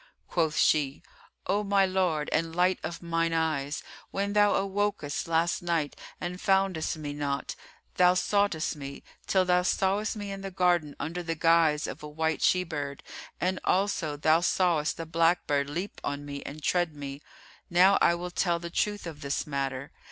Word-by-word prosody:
Quoth 160 -3 0
she, 145 -2 +2 0.4
"O 205 +3 +1
my 200 -1 +3
lord 180 -5 0
and 165 +1 0
light 180 +1 +2
of 170 +2 -6
mine 165 0 0
eyes, 155 -3 -1 0.3
when 200 +1 -2
thou 205 -1 +5
awokest 195 -7 -1
last 165 +1 +1
night 170 -4 -1 0.2
and 180 +1 -5
foundest 190 -5 +1
me 145 -2 -5
not, 140 -1 -3 0.4
thou 180 0 +5
soughtest 200 -5 +1
me, 140 -1 -8 0.2
till 190 -1 +3
thou 180 0 +3
sawest 195 +4 0
me 205 -2 -5
in 195 0 -6
the 195 - -5
garden, 175 -5 +1
under 170 +3 -3
the 165 -1 -3
guise 165 -2 +3
of - - -6
a 150 - -7
white 160 +1 -1
she 180 0 +3
bird, 145 -5 -5 0.4
and 185 +1 0
also 180 -6 0
thou 155 +2 +4
sawest 170 -3 +1
the 165 - -5
black 165 +2 +2
bird 140 -1 0
leap 175 +7 -5
on 145 0 -3
me 140 -1 -6
and 150 +1 -8
tread 175 -1 +1
me. 140 0 -7 0.5
Now 185 +3 +5
I 170 - +5
will 175 +1 -5
tell 175 -1 +1
the 170 0 -7
truth 205 +2 -1
of 155 -3 -8
this 140 -1 -2
matter. 140 -1 -3
170 Hz, 175 wpm, -28 LUFS, 150-185 Hz, 0.5 s, thou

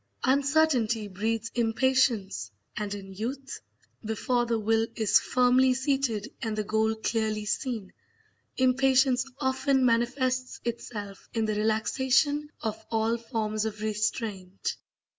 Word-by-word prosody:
Uncertainty 270 -5 +2
breeds 220 +3 -2
impatience; 230 - +1 0.3
and 205 -1 -3
in 195 -1 -9
youth, 255 +7 -5 0.4
before 240 +3 0
the 230 -1 +1
will 225 +1 +1
is 220 -3 +4
firmly 255 +1 +3
seated 265 -5 0
and 220 -2 -2
the 215 - 0
goal 220 +1 +1
clearly 220 -1 -1
seen, 220 -2 -3 0.6
impatience 260 0 +4 0.2
often 265 0 +2
manifests 255 +2 +1
itself 210 -4 -5
in 225 -1 +1
the 215 - 0
relaxation 260 +7 +1
of 220 -2 -3
all 225 +1 +1
forms 225 -2 -2
of 220 -1 -4
restraint. 210 -3 -2
230 Hz, 115 wpm, -28 LUFS, 215-260 Hz, 0.6 s, is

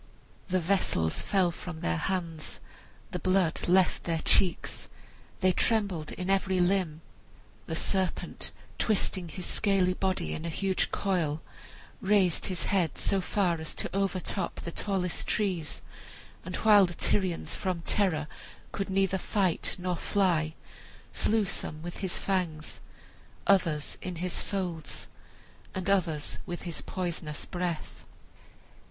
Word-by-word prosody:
The 185 -1 +2
vessels 165 - +1
fell 185 -3 +2
from 170 -1 -7
their 80 0 +1
hands, 170 - -2 0.5
the 180 - -2
blood 185 -2 +2
left 185 +1 +4
their 165 -1 +1
cheeks, 180 -3 +2 0.5
they 185 0 +5
trembled 190 -6 +1
in 180 - -4
every 190 -1 +2
limb. 175 -4 +2 0.7
The 160 - -2
serpent, 190 +2 0 0.3
twisting 190 -4 +1
his 180 +2 -5
scaly 195 -3 +3
body 190 0 0
in 155 - -4
a 170 - -2
huge 190 +3 +1
coil, 170 -6 0 0.6
raised 190 -3 +3
his 185 -2 -2
head 180 -7 +1
so 195 -1 +2 0.2
as 170 -5 +1
to - - -2
overtop 195 -1 -1
the 170 - -5
tallest 185 -2 -1
trees, 185 -7 0 0.6
and 185 +1 -4
while 205 -2 +6
the 175 - -6
Tyrians 185 -2 +1
from 180 -3 -2
terror 170 -8 +1 0.4
could 195 - -3
neither 190 0 +2
fight 185 -3 +1
nor 180 0 -1
fly, 165 -7 +1 0.6
slew 220 -1 +3
some 155 -4 -4
with 175 0 -5
his 190 -3 -2
fangs, 175 -5 -1 0.7
others 165 -7 +2
in 180 -1 -4
his 180 +2 -2
folds, 175 -6 -3 0.7
and 190 +1 0
others 165 -6 0
with 175 - -4
his 170 -3 -3
poisonous 170 -5 -3
breath. 175 -3 -3
180 Hz, 130 wpm, -29 LUFS, 165-195 Hz, 0.7 s, while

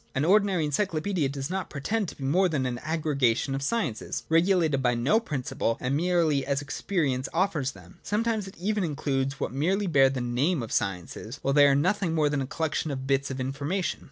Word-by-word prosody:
An 135 +3 +1
ordinary 195 -3 +3
encyclopaedia 160 0 0
does 135 +2 -4
not 190 -1 -3
pretend 200 +9 -2
to - - -10
be 135 - -9
more 180 +8 +3
than 140 -5 -1
an 120 -1 -2
aggregation 145 -5 0
of 135 - -2
sciences, 140 - -2
regulated 165 -4 +3
by 125 -2 +2
no 135 - +3
principle, 130 - -2
and 130 +2 -1
merely 165 -3 +2
ds 140 0 -1
experience 140 -3 -1
offers 160 -7 0
them. - - -16
Sometimes 220 -1 -1
it 190 - -11
even 205 +3 -1
includes 140 -3 -1
what - - -2
merely 185 +9 +1
bear 135 -7 +5
the 130 -1 -3
name 125 +5 0
of 115 - -7
sciences, 95 +6 -3
while 135 - +1
they 145 0 +7
are 140 - +4
nothing 175 +3 +1
more 150 -2 +3
than 145 -1 -1
a 130 - -3
collection 155 +1 -2
of 130 -2 -4
bits 135 0 +1
of 135 0 -5
in 130 +1 -2
formation. 150 +7 -2
145 Hz, 205 wpm, -27 LUFS, 135-180 Hz, -, they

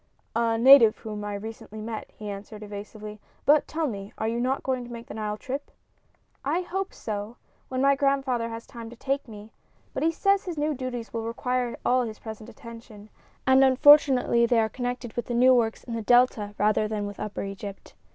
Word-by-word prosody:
"A 230 -1 +2
native 240 -2 +8
whom 210 -2 -6
I 205 0 -4
recently 220 +1 -8
met," 220 0 -6
he 210 - -7
answered, 205 +1 -7
evasively. 210 +1 -8 0.3
"But 295 +1 +5
tell 320 0 -2
me, 200 -6 -5
are 220 - -1
you 230 +1 -1
not 260 +3 0
going 255 -2 -1
to 240 - -10
make 235 0 -8
the - - -9
Nile 210 -1 -3
trip?" 270 +5 -5 0.7
"I 305 +6 0
hope 380 +2 -3
so, 215 +2 -6 0.3
when 260 0 -2
my 275 0 +5
grandfather 270 -4 0
has 230 0 -7
time 230 -2 -9
to 240 - -11
take 275 +3 -2
me; 215 -1 -11 0.4
but - - -3
he 325 - +3
says 395 +4 +1
his 350 -4 -5
new 300 +1 0
duties 250 -3 -5
will 230 - -2
require 245 +1 -2
all 255 +1 +3
his 220 -3 -4
present 220 0 -9
attention, 230 -3 -12 0.3
and 260 +1 +6
unfortunately 265 -3 +6
they 235 -1 +3
are 220 -1 +2
connected 245 -1 -4
with 240 - -4
the 240 - -2
new 255 +2 +6
works 230 -3 +1
in 235 - -7
the 230 - -2
Delta 220 -3 +3
rather 215 +1 +2
than 210 -1 -3
with 205 -1 -7
upper 210 -1 -4
Egypt." 195 0 -8
235 Hz, 200 wpm, -26 LUFS, 215-260 Hz, 0.7 s, native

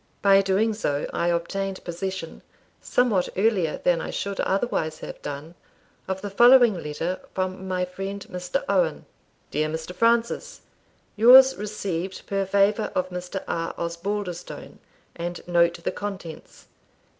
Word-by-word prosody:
By 195 -1 +6
doing 195 +3 +1
so, 145 -9 -2
I 170 - 0
obtained 190 +3 -2
possession, 175 0 -5 0.4
somewhat 220 -8 +1
earlier 190 -6 +2
than 170 -2 +3
I - - -5
should 200 -1 -4
otherwise 190 -6 0
have - - -8
done, 145 +3 -6 0.5
of 190 0 -3
the 205 - -5
following 240 -3 +6
letter 165 +5 -3 0.2
from 185 0 -3
my 180 -1 0
friend 195 +2 -6
Mr. 180 +8 -2
Owen: - - +1 0.5
"Dear 155 +1 0
Mr. 160 +3 -5
Francis, 235 - +1 0.5
"Yours 260 +4 +8
received 195 -3 -4
per 195 -1 -1
favour 200 +2 +2
of 185 0 0
Mr. 180 +2 -5
R. 165 0 -3
Osbaldistone, 175 +1 -5 0.4
and 175 +1 -6
note 170 -1 +2
the - - 0
contents. 195 -5 -8
190 Hz, 135 wpm, -25 LUFS, 170-205 Hz, 0.5 s, Yours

